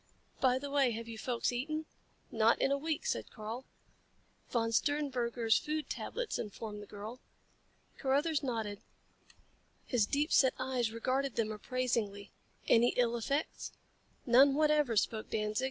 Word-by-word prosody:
"By 255 -1 +3
the 280 +1 -5
way, 280 -3 +4
have 230 +1 -5
you 225 -1 -7
folks 240 0 -1
eaten?" 310 +6 -3 0.5
"Not 225 0 +3
in 270 - +2
a 280 - +3
week," 315 +8 -2
said - - -2
Karl. 225 +4 -6 0.8
"Von 230 -2 0
Sternberger's 245 -4 +1
food 305 0 -3
tablets," - - -3
informed 210 0 -6
the 205 - -10
girl. 215 +4 -8 0.8
Carruthers 285 +3 +1
nodded. 225 -6 -3 1.0
His 230 -6 +2
deep 290 +5 0
set 260 -2 +5
eyes 255 -3 -1
regarded 260 +3 -1
them 220 -2 0
appraisingly. 215 -3 -2 0.4
"Any 235 +1 +5
ill 240 -1 +3
effects?" 275 +6 -2 0.5
"None 270 +2 +6
whatever," 300 -6 +3
spoke 215 +2 0
Danzig. 215 -1 -1
245 Hz, 140 wpm, -33 LUFS, 225-280 Hz, 1.0 s, None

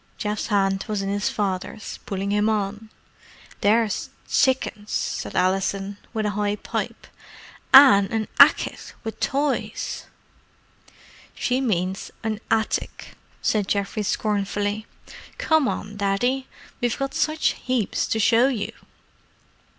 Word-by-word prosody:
Geoff's 210 -1 -2
hand 195 -2 +1
was 210 -3 -2
in 195 - -2
his 205 +1 0
father's, 200 +1 -3
pulling 200 -2 -2
him 210 +1 +2
on. 210 0 -2 0.7
"There's 215 +1 +2 0.2
tsickens!" 240 -5 +1
said - - -2
Alison 195 +2 0 0.2
in 215 -1 0
a 210 - +1
high 205 0 0
pipe. - - -4 0.7
"An' 260 -8 +8
a 220 -1 -1 0.2
ackit - - -1
wiv 220 -1 -6
toys." 280 0 -2 1.3
"She 255 +1 0
means 190 -6 -1
an 220 -1 -2
attic," 220 -1 -1 0.3
said 210 -3 +1
Geoffrey 200 +2 -1
scornfully. 205 +1 -1 0.5
"Come 315 -4 +3
on, 205 -3 -4
Daddy. 245 +7 0 0.3
We've 240 -1 0
got 275 -1 -3
such 310 0 +1 0.2
heaps 255 -5 0
to - - 0
show 230 +4 +5
you." 235 -7 -2
210 Hz, 120 wpm, -24 LUFS, 200-235 Hz, 1.3 s, An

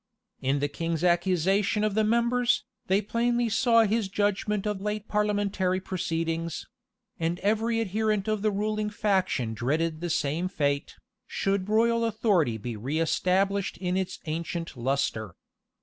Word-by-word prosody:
In 135 +2 +1
the 145 +1 0
king's 165 +2 -3
accusation 185 +4 +2
of 215 -1 +1
the 220 +1 +2
members, 235 0 +2 0.2
they 195 +3 +2
plainly 235 +2 +1
saw 230 +1 +4
his 215 -1 0
judgment 205 0 0
of 210 -2 -2
late 210 +1 -3
parliamentary 205 -3 0
proceedings; 165 -3 -2 0.5
and 165 +1 0
every 225 +3 +1
adherent 215 -1 0
of 215 -1 0
the 215 - +2
ruling 210 +1 -1
faction 190 - 0
dreaded 155 +7 -1
the 175 - -2
same 160 +3 0
fate, 145 -6 -1 0.3
should 195 0 -1
royal 230 +2 +3
authority 205 - +1
be 115 +2 -5
reëstablished 180 - 0
in 180 -1 -1
its 190 -1 -2
ancient 165 +1 -4
lustre. 120 -6 -1
195 Hz, 135 wpm, -27 LUFS, 165-215 Hz, 0.5 s, saw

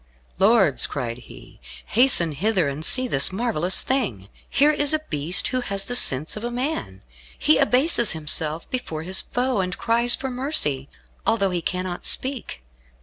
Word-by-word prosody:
"Lords," 200 - +3
cried 125 -4 -5
he, - - -15 0.3
"hasten 230 -9 +3
hither, 185 +2 0
and 140 +2 -5
see 255 +8 +4
this 140 - +1
marvellous 190 -4 0
thing. 120 - -3 0.2
Here 295 +2 +3
is 290 0 +2
a 310 - -3
beast 155 +5 0
who 255 -1 -2
has 200 -4 -1
the 245 - -3
sense 145 - +3
of 210 - -8
man. 240 - -4 0.3
He 155 - +2
abases 250 - +3
himself 155 0 -2
before 165 -11 -4
his 185 +3 0
foe, 250 -2 -2
and 180 -1 -4
cries 235 +1 +2
for 265 -1 -5
mercy, 245 - 0 0.3
although 200 -4 +1
he 175 -1 -2
cannot 180 0 -4
speak. 250 - -2
195 Hz, 155 wpm, -22 LUFS, 155-250 Hz, 0.3 s, see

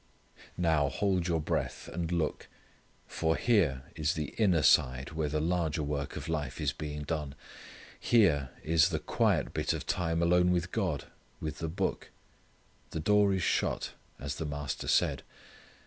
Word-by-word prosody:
Now, 80 -5 +2
hold 95 +2 0
your 85 -2 +1
breath, 75 -5 -2
and 85 0 -4
look, 85 -3 -1 0.6
for 80 0 0
here 85 - +2
is 75 +3 0
the 75 -2 -4
inner 90 -8 +3
side 65 +3 +3
where 80 -2 -1
the 75 +1 0
larger 80 -1 0
work 70 -1 -3
of - - -6
life 80 -3 -3
is - - 0
being 75 -1 -5
done. 75 -2 -3 0.6
Here 85 - +3
is 80 0 +4
the - - -1
quiet - - +1
bit - - 0
of - - -4
time 85 -1 0
alone 90 +1 +4
with 90 0 0
God, 90 -10 -1 0.4
with 75 0 -5
the 80 - -2
Book. 85 - -2 0.8
The - - -4
door 105 +4 +4
is 95 -2 0
shut, - - 0 0.3
as 70 +1 -5
the 80 - -3
Master 75 -2 -4
said. - - +2
80 Hz, 160 wpm, -30 LUFS, 75-90 Hz, 0.8 s, is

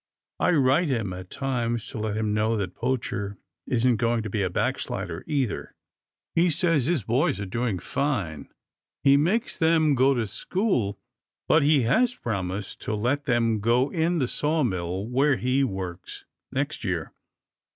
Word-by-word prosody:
I - - +3
write 145 +3 +3
him 110 -8 -1
at 90 0 -8
times, 120 -3 -2
to - - -6
let 105 -1 -2
him 110 -1 0
know 110 +1 +1
that 95 -3 -3
Poacher 105 -6 -2 0.3
isn't 120 -1 +2
going 115 -1 +1
to 110 - -5
be 105 - 0
a 95 - +1
backslider, - - -2
either. 135 -7 -2 0.6
He 175 +2 +3
says 165 -4 +1
his 165 -9 +1
boys 120 - +1
are 100 - -3
doing 115 +1 -1
fine. 100 - -2 0.5
He 140 0 +6
makes 190 - +1
them 160 -2 +4
go 135 +1 +4
to 120 -2 0
school, 120 - -1 0.5
but 160 - +5
he 145 -2 +4
has 240 - +2
promised 95 -3 -4
to 110 - -2
let 125 +7 0
them 115 -3 +2
go 120 +6 +2
in 170 +1 +1
the 130 -5 +1
sawmill 100 - -1
where 135 +4 +3
he 125 +5 +1
works 95 -6 -5 0.3
next 140 +2 -2
year." 90 -6 -2
120 Hz, 160 wpm, -26 LUFS, 105-145 Hz, 0.6 s, He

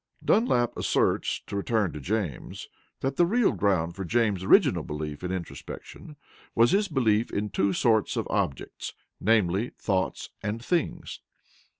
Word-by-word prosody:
Dunlap 125 - +2
asserts - - +1
(to - - -6
return 100 -1 0
to 75 - -6
James) 90 - -3 0.3
that 135 0 -2
the 175 - +5
real 235 +3 +3
ground 85 -4 0
for 95 - -4
James's 105 -1 +1
original 120 - +5
belief 75 0 -5
in 90 - -2
introspection 95 - -7 0.4
was 115 +4 +5
his 200 +2 +3
belief 115 - +2
in 105 0 -2
two 100 0 +1
sorts 110 +3 +2
of - - -1
objects, 70 - -2 0.3
namely, 105 +1 +2
thoughts 95 -3 -1
and 105 +2 -3
things. 175 -4 -1
105 Hz, 140 wpm, -27 LUFS, 90-120 Hz, 0.4 s, the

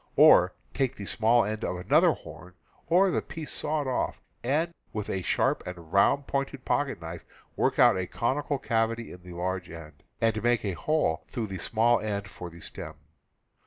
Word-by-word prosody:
Or - - +7 0.2
take 135 -1 0
the 100 - -7
small 115 +2 +3
end 110 +2 -3
of - - -1
another 90 - +4
horn, 85 +3 -12 0.3
or 185 +3 +4
the - - 0
piece 160 -2 -6
sawed 150 -1 -1
off, 130 -1 -1 0.2
and 155 +7 0 0.2
with 105 -1 -3
a 95 - -1
sharp - - +1
and 85 -3 -9
round 140 +8 +4
pointed 140 -1 -3
pocket 140 -6 0
knife 85 +1 -7 0.3
work - - +1
out - - +6
a 90 - -2
conical 140 +7 -1
cavity 115 -2 -1
at 90 - -11
the 90 0 -11
large 90 +1 -3
end, 80 -2 -11 0.2
and 110 -1 +1
make 120 -1 +2
a 100 - 0
hole 155 - 0
through 120 -4 -3
the 95 -3 -6
small 115 +4 +3
end 100 -2 -3
for 90 -2 -8
the 85 0 -13
stem. - - -7
110 Hz, 185 wpm, -28 LUFS, 90-135 Hz, 0.3 s, Or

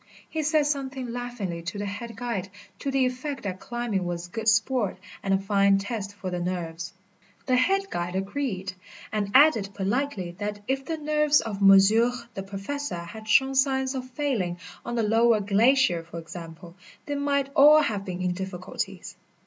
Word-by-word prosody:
He 320 - -3
said 305 0 +2
something 270 -3 -2
laughingly 235 -8 -4
to 170 +4 -5
the 205 - -3
head 205 +3 -6
guide 230 -5 -3 0.3
to 280 - -3
the 270 -1 +2
effect 260 +3 -3
that 190 -2 -4
climbing 240 -5 -2
was 175 0 -4
good 225 +2 -5
sport 220 -2 +2 0.2
and 195 - -2
a 195 - +5
fine 195 0 +3
test 205 0 -4
for 190 -2 -5
the 180 - -2
nerves. 170 -2 -4 0.5
The 255 - +2
head 390 +10 +2
guide 175 +1 -3
agreed, 195 -2 -2 0.4
and 210 -2 -1
added 260 -8 +6
politely 200 -2 -1
that 205 0 -3
if 270 +1 -1
the 325 +2 -3
nerves 300 0 +3
of 205 -3 -5
monsieur 200 +5 +6 0.2
the 195 - -4
Professor 195 +7 -4
had 175 +6 -8
shown 265 +3 +4
signs 265 0 +2
of 255 -1 -5
failing 245 -11 -1 0.3
on 240 - -4
the 230 - +1
lower 225 +1 +4
glacier, 205 -1 +3
for 170 0 -10
example, 165 +1 -9 0.3
they 290 - -3
might 280 -1 0
all 300 +2 +8
have 210 -7 -1
been 185 -1 -5
in 180 -1 +1
difficulties. 185 0 -5
215 Hz, 175 wpm, -26 LUFS, 190-265 Hz, 0.5 s, all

